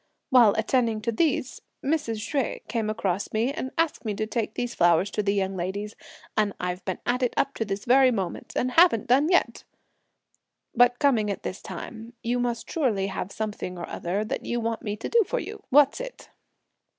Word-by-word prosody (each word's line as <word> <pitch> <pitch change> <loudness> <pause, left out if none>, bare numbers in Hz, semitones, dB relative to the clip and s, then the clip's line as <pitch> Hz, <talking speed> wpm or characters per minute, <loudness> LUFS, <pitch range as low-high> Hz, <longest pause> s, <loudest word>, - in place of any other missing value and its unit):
While 240 -5 +6
attending 225 0 +1
to 230 - -1
these, 260 0 0 0.2
Mrs. 230 -7 -1
Hsueh 275 -4 -2
came 220 -1 -1
across 200 -3 -2
me, 230 +5 +1
and 260 - -4
asked 330 -2 0
me 215 -3 -2
to 215 - -1
take 220 -1 -3
these 245 -1 -2
flowers 175 +3 +3
to 210 - 0
the 200 -1 +1
young 195 -1 0
ladies, 195 +4 -4 0.4
and 210 -2 +1
I've 180 +1 -3
been 185 - -2
at 250 +1 0
it 250 - 0
up 275 - +1
to 225 - -1
this 195 0 -4
very 260 +1 +6
moment, 195 -8 -3
and 255 - 0
haven't 325 - +5
done 275 +6 +3
yet! 355 - +2 1.1
But 245 0 +4
coming 240 -8 +2
at 200 - -4
this 185 - -5
time, 225 +6 -8
you 245 +1 0
must 240 -1 -2
surely 235 -12 0
have 190 +1 -4
something 210 -4 -4
or 170 - -5
other 195 +5 -2
that - - -4
you 240 - -2
want 230 -1 -2
me 205 -1 -3
to - - -5
do 465 -1 +4
for - - -3
you! 425 0 -7
what's 285 - +5
it?" - - -9
225 Hz, 200 wpm, -26 LUFS, 205-255 Hz, 1.1 s, While